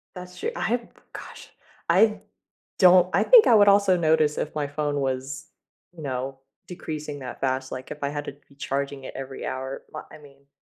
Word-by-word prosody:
That's 180 0 -10
true. 460 - -2
I - - -5
have 235 +1 -1 0.3
gosh, - - -10 0.4
I 215 -1 +4 0.6
don't 180 -1 +6
I - - +3
think - - +7
I 240 - +6
would 205 -1 +6
also 200 -2 +5
notice 155 -2 +2
if 155 - -3
my 145 -2 -1
phone 145 0 -2
was, 135 +1 -4 0.4
you 170 -2 -13
know, 135 0 -4 0.3
decreasing 155 -4 -6
that 130 - -8
fast, 130 0 -1
like, 130 0 -7
if 150 - -7
I 140 - 0
had 145 0 -5
to - - -6 0.2
be 140 - -21
charging 140 0 -4
it - - -8
every 135 0 -7
hour. 130 +1 -5
My 155 - -7
I - - -11
mean 140 -2 -19
145 Hz, 200 wpm, -25 LUFS, 135-180 Hz, 0.6 s, think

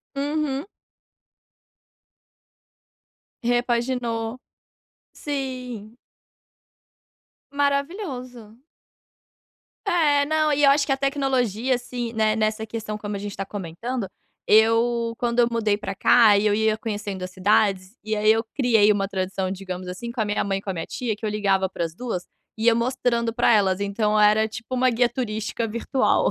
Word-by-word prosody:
Uhum. 290 +1 -2 2.8
Repaginou, 240 -1 -1 0.7
sim. 250 -6 -5 1.5
Maravilhoso. 280 - -3 1.3
É, 300 -7 +3
não, 310 0 +1
e 290 +1 +1
eu 280 - +7
acho 280 +1 +4
que 275 - -2
a 270 - +2
tecnologia, 265 -4 0
assim, 245 -1 -5
né, 215 -1 +2
nessa 215 0 -1
questão 215 -1 -5
como 210 -1 -5
a - - -4
gente 205 0 -6
tá 195 - -4
comentando, 205 +5 -5 0.4
eu 230 +2 +3
quando 240 0 -1
eu 235 - +5
mudei 220 -3 +1
pra 195 -2 -5
cá 215 0 +6
e 210 - +1
eu 210 - +3
ia 220 0 +2
conhecendo 205 -4 -4
as 185 - -6
cidades, 195 +1 +1
e 215 +1 -2
aí 215 +1 +4
eu 225 0 +2
criei 225 -6 +4
uma 195 -1 0
tradição, 190 -1 -2
digamos 185 -1 -6
assim, 210 +6 -6
com 235 -1 -3
a - - +1
minha 205 0 0
mãe 195 -1 -1
e - - -13
com 195 - -7
a - - -1
minha 165 - -4
tia, 230 -4 -3
que 220 - -7
eu 215 - 0
ligava 195 -2 +1
para 170 - -4
as 165 0 -8
2, 225 -7 -4 0.3
ia 225 +1 +3
mostrando 235 -1 0
pra - - +3
elas, 195 -3 +3
então 210 +1 0
era, 215 +1 +4
tipo, 230 +3 -6
uma 255 0 +3
guia 240 0 +2
turística 225 -2 -3
virtual. 235 +4 +1
225 Hz, 155 wpm, -23 LUFS, 205-250 Hz, 2.8 s, eu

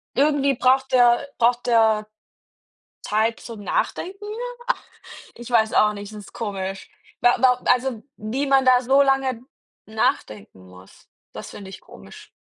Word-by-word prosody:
Irgendwie 280 -1 +2
braucht 265 +2 +2
der 245 +1 +4
braucht 240 +1 +2
der 220 -3 +2 1.0
Zeit 220 +2 0
zum 230 -3 -9
Nachdenken? 395 - -3 1.1
Ich 240 +1 -11
weiß 220 -2 +2
auch 210 0 +4
nicht, 205 0 -9
das 210 - -9
ist 200 - -14
komisch. 195 -3 -5 0.3
Wa 245 - +4
wa 250 -1 +3
also 250 -3 +1
wie 240 +7 -3
man 270 -1 +3
da 255 -1 +5
so 265 +3 +4
lange 270 -3 0 0.4
nachdenken 105 - -3
muss, 90 +1 -18 0.2
das - - -9
finde 200 -2 -10
ich - - -11
komisch. - - -15
240 Hz, 140 wpm, -22 LUFS, 215-265 Hz, 1.1 s, da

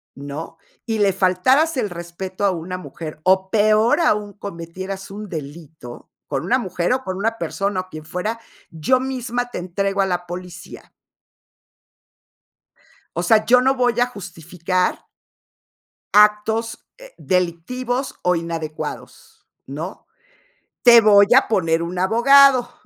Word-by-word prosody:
¿no?, 145 +4 -8 0.3
"y 225 -2 -2
le 200 -1 +3
faltaras 255 - +2
el 220 -5 -1
respeto 180 +3 -5
a 195 - +3
una 180 +1 -5
mujer, 160 -4 -9
o 190 0 +2
peor 215 +7 +3
aún, 210 -9 +1
cometieras 190 +1 -8
un 210 +1 -7
delito 150 -4 -9 0.2
con 135 -2 -3
una 255 - +2
mujer 180 -1 -1
o 260 0 -2
con 185 0 -5
una 225 +3 -1
persona, 195 -3 -2
o 185 - -15
quien 155 -3 -10
fuera, 210 +7 -4 0.3
yo 210 +12 +1
misma 245 -2 -3
te - - -5
entrego 195 +2 -3
a 195 - +2
la 175 -1 -2
policía". 175 -1 -10 2.2
O 175 - -2
sea, 215 +4 +3
yo 250 +1 +5
no 265 +1 +2
voy 245 -2 0
a 245 - +4
justificar 180 -4 -3 1.1
actos, 210 +2 +2
eh, - - -14
delictivos 235 +9 -2
o 180 0 +2
inadecuados, 165 -2 -7 0.2
¿no? 160 +8 -7 0.8
Te 235 -2 +8
voy 205 -2 +6
a 265 - +4
poner 165 -6 +1
un 175 +2 -5
abogado, 245 +5 +5
195 Hz, 135 wpm, -20 LUFS, 170-230 Hz, 2.2 s, Te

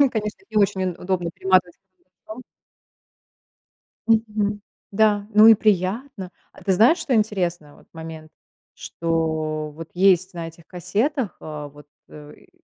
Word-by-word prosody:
ну, 280 -2 +5
конечно, 215 - -4
не - - -7
очень 195 -2 +2
уд 180 -2 -3
удобно 180 -2 -2
перематывать 185 0 +1 0.2
карандашом. 215 +6 -13 1.7
Мгм. 210 -2 +1 0.3
Да, 205 0 +2
ну 215 +1 +8
и 225 - +9
приятно. 205 +1 -1 0.2
А - - -17
ты 195 - +1
знаешь, 230 - +5
что 270 -6 0
интересно, 175 -8 -1
вот - - -21
момент, 160 -1 -9 0.4
что 160 -2 -2
вот 165 0 -9
есть 185 0 +3
на 170 -1 -5
этих 165 0 -15
кассетах, 215 - -2
э, 150 -1 -7
вот, 145 0 -16 0.2
э, 150 -1 -12
и, - - -23
185 Hz, 140 wpm, -22 LUFS, 165-215 Hz, 1.7 s, и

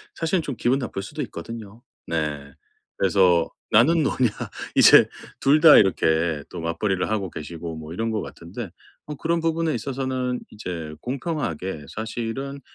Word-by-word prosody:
사실은 165 +2 0
좀 140 -5 -5
기분 130 +3 +1
나쁠 110 -6 -4
수도 - - -6
있거든요. 110 +4 -8 0.3
네. 75 -4 -3 0.4
그래서 90 -3 +3 0.2
"나는 150 +9 +5
노냐?" 130 -3 +2 0.5
이제 - - +8 0.3
2 145 +3 +5
다 160 -2 +10
이렇게 80 -5 +2
또 85 - -7
맞벌이를 90 +3 -1
하고 100 -4 -1
계시고 80 +1 -7
뭐 80 0 -9
이런 115 +4 -2
것 110 - -1
같은데 95 +6 -8 0.4
어 150 - -5
그런 165 +3 -1
부분에 165 -1 0
있어서는 130 0 -2
이제 85 -7 -6
공평하게 120 - -3
사실은 120 +5 -5
110 Hz, 300 characters per minute, -24 LUFS, 85-135 Hz, 0.5 s, 다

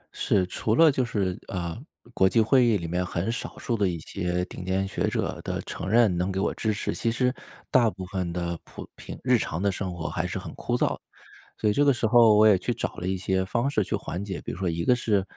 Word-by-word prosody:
是， 95 -3 +2
除 110 +4 -1
了 160 +3 +7
就 130 -2 0
是 100 -7 -1
呃， 85 -3 -4 0.4
国 95 -4 +4
际 115 - +2
会 125 +4 +5
议 115 -3 +3
里 85 -3 -5
面 90 +2 -1
很 90 +4 -2
少 115 - -6
数 120 - -2
的 100 -4 +1
一 85 - -3
些 90 +2 -2
顶 90 - -9
尖 95 +1 0
学 95 - -1
者 - - -2
的 - - -3
承 95 - -5
认 115 -4 +4
能 90 +2 -1
给 95 - -2
我 100 - 0
支 110 - -1
持， 105 - -2
其 115 - -1
实 125 +2 +1 0.4
大 120 -3 +5
部 95 -2 -7
分 90 -2 -3
的 85 -1 -3
普 - - -10
平 - - -9
日 - - +4
常 80 - -3
的 100 +1 +1
生 95 0 -4
活 85 - -4
还 - - -2
是 - - -4
很 - - -8
枯 - - -2
燥。 - - 0 0.6
所 105 - +2
以 - - +2
这 145 +6 +3
个 140 - +5
时 120 -2 0
候 115 -1 +6
我 110 +1 +6
也 105 -3 +6
去 120 +7 -2
找 120 - -4
了 90 - -5
一 95 - 0
些 95 0 0
方 120 +6 0
式 110 -7 +1
去 - - -2
缓 90 +3 -5
解， 95 -3 -5
比 - - -5
如 - - -7
说 95 -1 -2
一 85 0 -1
个 125 - +4
是 105 -5 +1
95 Hz, 280 characters per minute, -26 LUFS, 90-115 Hz, 0.6 s, 了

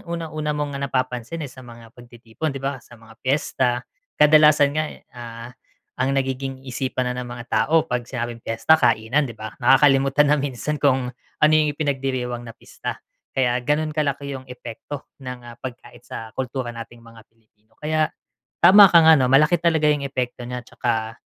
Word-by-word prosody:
unang-una 155 -3 -3
mong 145 -1 -3 0.2
napapansin, 130 +4 -3
eh, 140 - -7
sa - - -13
mga 115 -2 -13
pagtitipon 120 +4 -7
'di 135 - -6
ba 135 -1 -3
sa 120 - -17
mga 115 0 -17
piyesta. 130 -2 0 0.3
Kadalasan 150 -1 +6
nga, 155 +1 0 0.3
ah, 120 -1 -9 0.5
ang 130 +2 0
nagiging 135 0 -2
isipan 130 0 -2
na 125 - -3
ng 125 - -7
mga 120 -1 -8
tao 160 +1 +2
pag 125 -1 -2
sinabing 120 -2 -5
piyesta 135 +8 +3
kainan 115 +7 +2
'di - - -7
ba, 110 0 -7
nakakalimutan 135 +2 +4
na 150 - +4
minsan 145 +2 -3
kung 130 -3 +2 0.3
ano 150 0 +4
yung 155 -1 +4
ipinagdiriwang 130 -4 -2
na - - -8
pista. - - -7 0.4
Kaya 125 -2 +2
ganun 155 +3 0
kalaki 140 -2 -1
yung 130 - -11
epekto 125 +3 -8 0.2
ng, 125 -1 -7
ah, 120 0 -11
pagkain 120 -1 -9
sa 110 -1 -9
kultura 130 -1 -4
nating 115 0 -10
mga 115 0 -15
Pilipino. 110 -1 -37
Kaya 155 0 0 0.5
tama 195 +4 +9
ka 170 -1 +7 0.2
'no, 130 - +2
malaki 150 +6 +5
talaga 165 -2 +2
yung 145 -2 0
epekto 125 -2 -4
niya 125 0 -5
'tsaka 115 -2 -3
130 Hz, 170 wpm, -22 LUFS, 120-150 Hz, 0.5 s, tama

